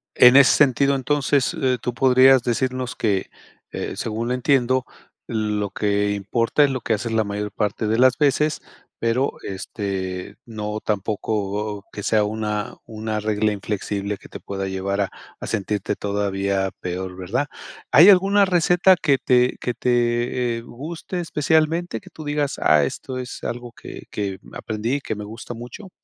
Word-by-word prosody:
En 125 +1 +8
ese 140 -1 +8
sentido, 140 0 +3
entonces, 140 +2 +1
eh, 130 -2 +2
tú 125 - -2
podrías 130 0 +5
decirnos 130 -1 -1
que 100 -4 0 0.4
eh, - - -4
según 115 +1 -3
lo - - +1
entiendo, 130 0 +2 0.4
lo 105 -2 -1
que 100 0 0
importa 115 +7 +1
es 140 - +3
lo 130 -2 -3
que 115 - 0
haces 110 +2 -2
la 110 -1 +2
mayor 105 0 -4
parte 105 +1 -2
de 110 +2 +1
las 130 0 +5
veces, 150 +1 +2 0.4
pero, 115 +4 +1
este, 95 -2 -4
no 105 -2 -5
tampoco 105 0 -2
que 105 - -6
sea 105 0 +2
una 105 0 -3
una 110 -1 -4
regla 105 0 +1
inflexible 100 0 -3
que - - -15
te - - -9
pueda 95 -1 -4
llevar 95 +1 -2
a 100 - 0 0.3
a - - -6
sentirte 105 -2 -2
todavía 100 -1 -1
peor, 90 +1 -4
¿verdad? 95 +10 -2 0.4
¿Hay 170 +6 +9
alguna 200 +1 +5
receta 180 +1 +4
que 140 -3 +3
te 125 -1 +2
que 125 - -1
te, 120 0 0
eh, - - -6
guste 160 +9 -6
especialmente, 160 -3 0
que - - -15
tú 155 - -10
digas, 145 -1 -1
ah, 75 -1 +4
esto 130 - -4
es 125 -1 -7
algo 120 0 -5
que - - -10
que 100 -2 -4
aprendí, 110 +6 -2
que 110 - -4
me 105 - -6
gusta 110 +3 -8
mucho? 125 - -9
115 Hz, 160 wpm, -22 LUFS, 105-130 Hz, 0.4 s, Hay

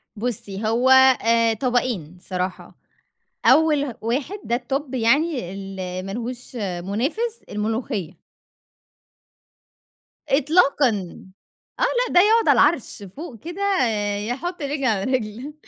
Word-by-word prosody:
بُصّي، 210 -2 -4
هو 240 +4 +2
آآ 230 -3 +5
طبقين 235 - -1
الصراحة، 185 0 -5 0.7
أول 300 -5 +4
واحد 265 - -2
ده 235 - 0
الTop 265 +2 -4
يعني 255 - +1
ال 195 0 -7 0.3
ما 195 - -5
لهوش 245 +2 -6 0.3
مُنافِس، 315 - -2
الملوخية. 210 -4 -3 2.1
إطلاقًا. 275 - +2 0.6
آه. - - +1
لأ - - +1
ده 355 - +7
يقعد 445 +3 +4
على - - +7
العَرْش 265 -9 +1
فوق 230 - -9
كده 345 - -7 0.7
يحُط 340 +8 -4
رِجل 285 -1 -2
على 210 -6 +1
رِجل. 250 +3 -3
250 Hz, 105 wpm, -22 LUFS, 215-295 Hz, 2.1 s, ده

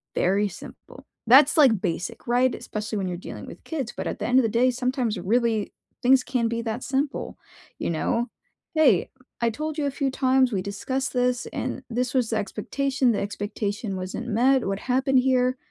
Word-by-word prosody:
Very 200 +3 +2
simple. 185 - -12 0.2
That's, 270 +6 +7
like, 235 -10 +5
basic, 175 +2 -4
right, 245 +1 +3
especially 215 +1 -5
when 190 - -2
you're 175 -1 -3
dealing - - -8
with - - -11
kids, 275 -8 -4
but - - -3
at - - -4
the - - -2
end 250 +2 +3
of - - +3
the 225 - +1
day, 240 +3 +3
sometimes, 250 -2 -1
really, 220 +2 0 0.3
things 255 0 +5
can 245 -3 0
be 230 0 -2
that 230 +2 -3
simple, 275 +1 -2 0.4
you - - -2
know? 230 +9 -1 0.5
"Hey, 265 - +4 0.3
I 230 - +4
told 305 +5 -4
you 295 - 0
a - - -1
few 275 0 -1
times, 260 -1 +3
we 190 - 0
discussed 260 +9 -3
this, 250 0 0
and 260 +1 -4
this 245 +2 -1
was 250 -4 +1
the 220 - +1
expectation, 255 +5 0
the 215 - 0
expectation 205 0 -3
wasn't 185 +6 -5
met, 250 +3 +3
what 195 - -1
happened 265 +1 +1
here? 255 0 +2
245 Hz, 190 wpm, -25 LUFS, 210-265 Hz, 0.5 s, That's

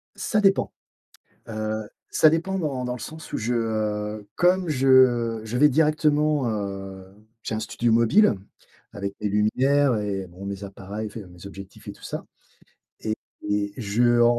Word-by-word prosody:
Ça 210 -2 0
dépend. 195 -1 +3 0.8
Heu, 110 -1 -3 0.2
ça 155 - +6
dépend 170 +5 0
dans 140 -7 -2
dans 125 - -2
le 125 - -7
sens 160 +4 -9
où - - -1
je, 120 +2 -1
heu 105 -2 -2
comme 180 0 +3
je 130 -5 +4
je 110 +2 -3
vais 150 +3 +6
directement, 150 -2 +2
heu 95 -2 -4 0.4
j'ai 110 - -3
un 110 - -2
studio 120 0 0
mobile 115 - +5 0.6
avec 100 0 -4
des 105 - 0
lumières 130 +6 +3
et 100 -2 -3
bon 90 +3 -11
mes 100 0 -5
appareils, 100 +2 -6
enfin 110 +2 -7
mes 90 +2 -12
objectifs 100 -1 -11
et - - -5
tout - - -19
ça - - -5 1.2
et 105 0 0
je, 110 0 0
heu 120 0 +5
115 Hz, 160 wpm, -25 LUFS, 105-140 Hz, 1.2 s, ça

